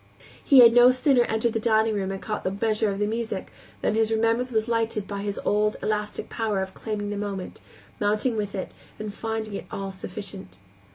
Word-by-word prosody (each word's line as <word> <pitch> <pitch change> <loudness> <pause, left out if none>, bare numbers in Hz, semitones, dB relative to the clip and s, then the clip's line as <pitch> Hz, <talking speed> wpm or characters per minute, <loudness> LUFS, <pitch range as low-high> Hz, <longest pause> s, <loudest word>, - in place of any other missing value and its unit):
He 275 -4 +8
had 230 -1 +8
no 245 +1 +8
sooner 255 -1 +3
entered 220 +1 0
the 225 - 0
dining 220 0 +2
room 195 -2 -1
and 195 - -4
caught 210 +1 -4
the - - 0
measure 215 +2 0
of 195 - -2
the 205 - +1
music 220 -2 -3 0.3
than - - +2
his 220 0 +2
remembrance 230 +3 +1
was 220 -1 0
lightened 225 -3 0
by 200 -1 -4
his 200 0 -3
old 210 +1 +2
elastic 210 -1 -2
power 220 -4 -1
of 190 0 -8
claiming 205 -2 -4
the 205 - -3
moment, 200 -2 -5 0.4
mounting 215 +4 +1
with 205 -2 -3
it, 190 - -5 0.2
and 210 -1 -5
finding 220 -1 -4
it - - -5
all 195 0 -4
sufficient. 190 +1 -8
215 Hz, 205 wpm, -25 LUFS, 205-225 Hz, 0.4 s, He